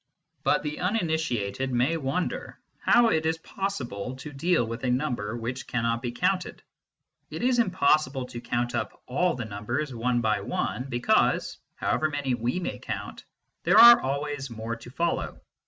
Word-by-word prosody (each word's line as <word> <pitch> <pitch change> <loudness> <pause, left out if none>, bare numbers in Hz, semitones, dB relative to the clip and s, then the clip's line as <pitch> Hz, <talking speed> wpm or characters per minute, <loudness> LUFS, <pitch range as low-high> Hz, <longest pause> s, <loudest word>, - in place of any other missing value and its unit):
But - - +2
the 150 0 -4
uninitiated 160 - -1
may 125 +6 +2
wonder 155 +3 -3 0.2
how 240 -1 +5
it 160 -5 +1
is 160 0 0
possible 130 - -4
to 145 +3 -9
deal 165 -1 +2
with 115 +1 -6
a 130 - +1
number 125 -4 -1
which 125 +3 -5
cannot 115 -1 0
be 120 - -3
counted. 180 +8 -1 0.7
It - - -5
is 250 -1 +3
im 230 - +3
possible 140 -6 +2
to 120 -1 -8
count 120 0 -1
up 115 -3 -4
all 175 +8 +1
the 125 -2 -4
numbers, 120 +7 -3
one 120 +1 0
by 110 -3 +1
one, 125 +5 -2
because, 120 -3 +1 0.2
however 155 - 0
many 145 -3 -1
we 120 +7 -1
may 180 - -4
count, - - -6 0.4
there - - +4
are 235 0 +10
always 140 0 -3
more 115 0 -4
to 115 +1 -12
follow. 170 +6 -2
130 Hz, 165 wpm, -27 LUFS, 120-160 Hz, 0.7 s, are